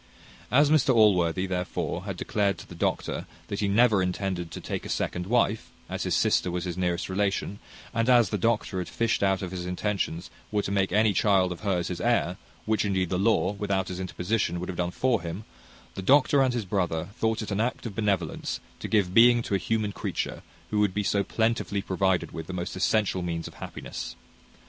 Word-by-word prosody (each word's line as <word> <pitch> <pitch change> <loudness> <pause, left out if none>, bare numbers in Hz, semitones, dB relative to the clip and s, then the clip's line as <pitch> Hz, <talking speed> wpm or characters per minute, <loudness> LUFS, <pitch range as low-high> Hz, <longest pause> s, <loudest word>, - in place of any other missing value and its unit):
As 145 +3 +4
Mr 135 -4 +4
Allworthy, 95 -5 +4
therefore, 90 -1 -3
had - - -4
declared 100 -3 0
to - - -11
the - - -10
doctor 85 - -2 0.2
that 100 - -3
he 100 - +1
never 105 0 +4
intended 90 -1 -2
to - - -7
take - - -4
a - - -7
second 90 0 -2
wife, 115 -1 +1 0.2
as - - -4
his - - 0
sister - - +2
was 90 0 -2
his 90 -2 -3
nearest 90 -1 -1
relation, 100 +1 -1 0.3
and 115 +2 +1
as 120 -3 +5
the 105 - 0
doctor 110 -2 0
had 90 - -4
fished 115 +1 0
out 95 -2 +2
that 90 -2 -4
his 90 -1 -5
intentions 90 -2 -2 0.2
were 105 -1 +1
to - - -3
make 95 -1 +1
any 105 +1 +3
child 95 -3 +3
of 90 - -5
hers 95 -5 -1
his 90 - -4
heir, 115 -6 +1 0.3
which 110 0 +1
indeed 95 -3 0
the 90 - 0
law, 100 -2 +3
without 100 -2 -1
his 90 0 -5
interposition, 90 +1 -1
would 90 - -5
have 90 - -5
done 90 0 +1
for 120 +3 +1
him; 85 +5 -5 0.5
the - - -5
doctor 140 +5 +5
and 130 -2 +2
his 115 -4 -2
brother 90 -3 -1
thought 110 -1 0
it 105 - -6
an 100 +2 0
act 125 +2 -2
of 115 - -4
benevolence 100 -6 -1 0.2
to - - -5
give 100 -5 +1
being 120 +1 +6
to - - -4
a 100 - +3
human 110 -1 -1
creature, - - -3 0.3
who 105 - +1
would 105 -3 +2
be 105 - 0
so 100 0 +1
plentifully 110 -3 0
provided 95 -1 0
with 80 -1 -7
the 95 - -5
most 90 -1 -4
essential 95 0 +1
means 85 -1 -3
of - - -11
happiness. - - -7
100 Hz, 210 wpm, -27 LUFS, 90-110 Hz, 0.5 s, being